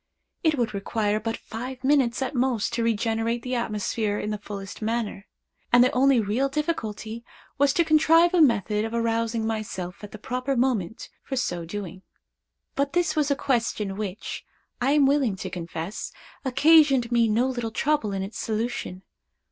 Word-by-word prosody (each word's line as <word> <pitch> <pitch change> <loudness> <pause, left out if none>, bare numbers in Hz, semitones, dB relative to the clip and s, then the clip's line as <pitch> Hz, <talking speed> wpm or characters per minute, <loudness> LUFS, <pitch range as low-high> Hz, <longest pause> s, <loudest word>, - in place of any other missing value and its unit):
It 315 -3 +3
would 235 -4 0
require 205 +1 -1
but 225 +1 -3
five 255 +3 -7
minutes 265 -3 +2
at 260 - -3
most 250 -4 0
to 235 - 0
regenerate 230 +1 0
the 255 - -3
atmosphere 215 -2 -1
in 210 - -3
the 210 - -3
fullest 200 -1 -8
manner, 220 -2 -2 0.4
and 245 0 +7
the 255 - +3
only 265 0 +4
real 225 +6 0
difficulty 235 -7 -3 0.4
was 285 0 +5
to 340 - +3
contrive 325 +2 +5
a 355 - +5
method 215 - +3
of 225 +1 -3
arousing 230 -1 0
myself 210 -4 -4
at 205 - -8
the - - -8
proper 255 +5 -2
moment 235 -6 -1
for 270 - -5
so 175 -9 -2
doing. 190 0 -6 0.7
But 280 0 -1
this 350 -1 +1
was 300 -2 +1
a 280 - +2
question 230 -7 -1
which, 205 0 -5 0.4
I 270 +3 +3
am 295 -2 +5
willing 270 -7 +2
to 190 - -6
confess, 170 +2 -5 0.3
occasioned 275 -2 +5
me 235 -1 +4
no 225 +3 +2
little 240 -3 -2
trouble 270 -1 0
in 195 -1 -2
its 200 +2 -7
solution. 220 -4 -3
230 Hz, 170 wpm, -25 LUFS, 210-265 Hz, 0.7 s, and